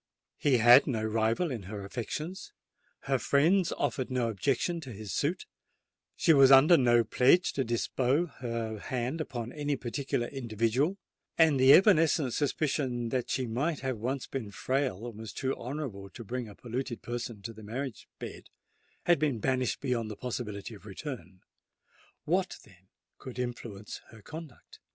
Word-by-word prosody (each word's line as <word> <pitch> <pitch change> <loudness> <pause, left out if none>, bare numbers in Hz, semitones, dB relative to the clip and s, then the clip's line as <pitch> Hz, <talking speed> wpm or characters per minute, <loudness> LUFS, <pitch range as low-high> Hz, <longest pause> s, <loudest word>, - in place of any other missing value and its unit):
He 140 -4 +3
had 120 +1 +7
no 115 -6 -1
rival 115 +9 +1
in 120 -4 -4
her 100 -2 -6
affections—her 135 - -5
friends 165 - +3
offered 130 -2 -2
no 125 -3 0
objection 135 - 0
to 135 -5 -8
his 105 -3 -7
suit—she 165 +1 -2
was 135 -2 +7
under 135 +6 +8
no 120 -4 +4
pledge 130 +10 +3
to 135 - 0
bestow 130 +6 +1
her 115 -7 -5
hand 130 +8 -3
upon 120 -5 -5
any 145 -1 -1
particular 135 0 -2
individual—and 135 - 0
the 130 +1 +7
evanescent 160 - +5
suspicion 135 -4 -1
that 125 0 -2
she 130 - 0
might 140 +7 -1
have 130 -4 -2
once 130 +4 -2
been 125 -6 -5
frail 125 0 -1
and 115 -3 -8
was 110 -1 -7
too 135 0 -2
honourable 120 -7 -6
to 115 - -10
bring 120 +1 -4
a 100 - -12
polluted 120 +1 -5
person 120 -3 -5
to 115 - -6
the 110 - -12
marriage 120 +4 -5
bed, - - -9 0.5
had 175 -3 +4
been 145 -5 +1
banished 130 +2 0
beyond 120 -5 -1
the 105 - -6
possibility 115 -4 -5
of 105 0 -13
return:—what, 145 - -6
then, 95 -2 -21 0.3
could 130 -1 -9
influence 115 -4 -5
her 110 -2 -15
conduct? 160 -4 -11
125 Hz, 150 wpm, -30 LUFS, 115-140 Hz, 0.5 s, under